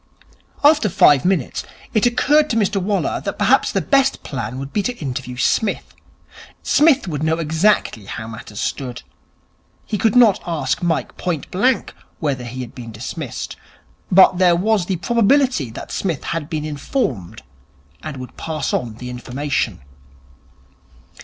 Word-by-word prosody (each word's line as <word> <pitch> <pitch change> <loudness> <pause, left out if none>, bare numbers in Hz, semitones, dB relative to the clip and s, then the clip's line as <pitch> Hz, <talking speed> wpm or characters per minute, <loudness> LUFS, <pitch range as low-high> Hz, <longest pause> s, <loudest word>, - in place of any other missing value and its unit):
After 295 -7 +5
five 145 -5 +5
minutes, 180 -8 0 0.3
it 215 +2 +3
occurred 290 +5 +3
to - - 0
Mr 205 -2 +1
Waller 200 +2 -1
that - - -4
perhaps - - +3
the - - 0
best 275 -1 +2
plan 125 -3 -5
would 135 +1 -7
be 210 - +1
to 245 +4 -3
interview 130 -3 -5
Psmith. 210 - 0 0.7
Psmith 290 -6 +4
would 150 -4 -3
know 160 +1 +1
exactly 160 - +1
how 110 +3 -6
matters 110 -2 -9
stood. 125 -2 -4 0.8
He 210 - -3
could 225 0 +2
not 235 -6 +6
ask 140 -3 -1
Mike 170 -2 -1
point 170 -5 -3
blank 245 +7 +1 0.3
whether 135 -5 -2
he 125 +2 -6
had 125 - -8
been 115 -2 -9
dismissed. 125 +5 -6 0.5
But 185 -1 +6
there 180 -2 +5
was 195 0 +1
the 190 - 0
probability 235 - +2
that 110 - -9
Psmith 170 -8 -2
had 165 -2 -3
been 155 -2 -3
informed 140 - -3 0.6
and 155 -3 -6
would 125 -2 -9
pass 160 -1 -3
on 115 -3 -2
the 125 +2 -7
information. 125 - -2
160 Hz, 150 wpm, -20 LUFS, 130-210 Hz, 0.8 s, not